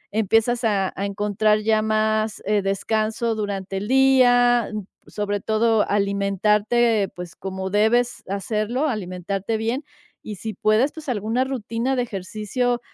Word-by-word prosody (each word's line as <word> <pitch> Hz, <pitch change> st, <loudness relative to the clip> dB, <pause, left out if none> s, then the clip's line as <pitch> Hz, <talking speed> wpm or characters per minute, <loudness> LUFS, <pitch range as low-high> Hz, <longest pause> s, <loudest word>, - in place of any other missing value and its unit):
empiezas 225 Hz, +3 st, +2 dB
a 200 Hz, -4 st, +1 dB
a 200 Hz, -, -2 dB
encontrar 210 Hz, +1 st, +1 dB
ya 215 Hz, 0 st, +2 dB
más, 215 Hz, 0 st, 0 dB
eh 205 Hz, 0 st, +2 dB
descanso 220 Hz, +4 st, -1 dB
durante 195 Hz, -2 st, -3 dB
el 205 Hz, +2 st, -4 dB
día, 245 Hz, -3 st, +4 dB, 0.4 s
sobre 205 Hz, -1 st, -2 dB
todo 220 Hz, 0 st, +2 dB
alimentarte, 205 Hz, +2 st, +1 dB
pues, 180 Hz, 0 st, -8 dB
como 190 Hz, 0 st, -5 dB
debes 225 Hz, +4 st, +1 dB
hacerlo, 215 Hz, +8 st, -1 dB
alimentarte 195 Hz, -1 st, -3 dB
bien 235 Hz, +6 st, -2 dB, 0.4 s
y 210 Hz, -, -7 dB
si 220 Hz, +3 st, -6 dB
puedes, 215 Hz, +8 st, +2 dB
pues, 315 Hz, -3 st, -8 dB
alguna 225 Hz, +2 st, 0 dB
rutina 255 Hz, 0 st, -2 dB
de 245 Hz, -, +2 dB
ejercicio 215 Hz, +4 st, -2 dB
215 Hz, 130 wpm, -22 LUFS, 200-235 Hz, 0.4 s, día